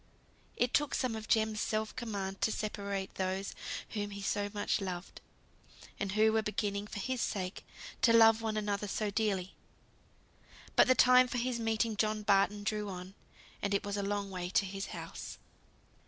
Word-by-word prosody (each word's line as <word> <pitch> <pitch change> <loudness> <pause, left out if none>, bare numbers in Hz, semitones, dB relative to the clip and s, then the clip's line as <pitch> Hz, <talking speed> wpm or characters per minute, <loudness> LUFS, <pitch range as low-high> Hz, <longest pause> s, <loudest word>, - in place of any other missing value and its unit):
It 245 0 +1
took 295 -2 +2
some 250 -4 0
of 220 0 -6
Jem's 220 -1 +2
self 215 0 -1
command 200 -6 -4
to 220 - +2
separate 200 -2 -3
those 190 +1 -2 0.4
whom 205 -2 -3
he 200 0 -7
so 205 +1 0
much 205 0 0
loved, 180 -1 -5 0.8
and 195 -1 -2
who 220 +1 +4
were 220 - +3
beginning, 205 -1 -2
for - - -7
his 255 +4 -2
sake, 185 -2 -3 0.4
to 235 - +5
love 225 -1 +7
one 220 -1 -1
another 205 -1 -1
so 210 +1 -1
dearly. 200 -3 0 1.2
But - - +7
the 255 - +5
time 255 0 +7
for 245 - -3
his 245 0 -1
meeting 225 0 0
John 215 0 0
Barton 205 0 +3
drew 210 0 -1
on: 185 0 -7 0.5
and 200 0 0
it 200 - 0
was 200 0 -2
a 205 - -1
long 200 0 -2
way 180 -1 -4
to 195 - +2
his 195 +1 -5
house. - - -7
210 Hz, 175 wpm, -33 LUFS, 195-220 Hz, 1.2 s, love